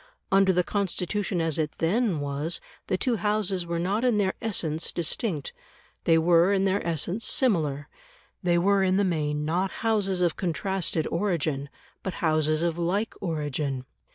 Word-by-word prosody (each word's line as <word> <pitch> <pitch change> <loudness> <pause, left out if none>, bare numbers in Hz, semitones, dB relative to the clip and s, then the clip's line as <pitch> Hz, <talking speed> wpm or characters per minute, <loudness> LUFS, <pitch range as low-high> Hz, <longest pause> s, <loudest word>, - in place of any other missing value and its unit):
Under 195 0 +5
the 180 0 +2
Constitution 195 0 -1
as 165 -1 0
it 155 -1 -1
then 190 +1 +1
was 145 +4 -2 0.3
the 185 - +1
two 240 +3 +1
Houses 200 -4 0
were 170 0 -1
not 195 +7 0
in 245 -4 +3
their 195 -2 +2
essence 165 -8 -1
distinct; 170 - -2 0.5
they 165 - +5
were 170 +3 +4
in 195 -1 +2
their 195 +1 +1
essence 170 +6 -2
similar; 155 - +1 0.5
they 175 -3 +2
were, 195 +3 +3
in 190 0 +3
the 205 - +3
main, 150 -5 0
not 180 +5 0 0.2
Houses 200 -4 +1
of 175 -3 +2
contrasted 180 -2 -1
origin, 160 -6 -1 0.3
but 190 - -4
Houses 155 -1 +1
of 170 0 0
like 195 +6 0
origin. 145 -6 -2
175 Hz, 155 wpm, -27 LUFS, 160-195 Hz, 0.5 s, Under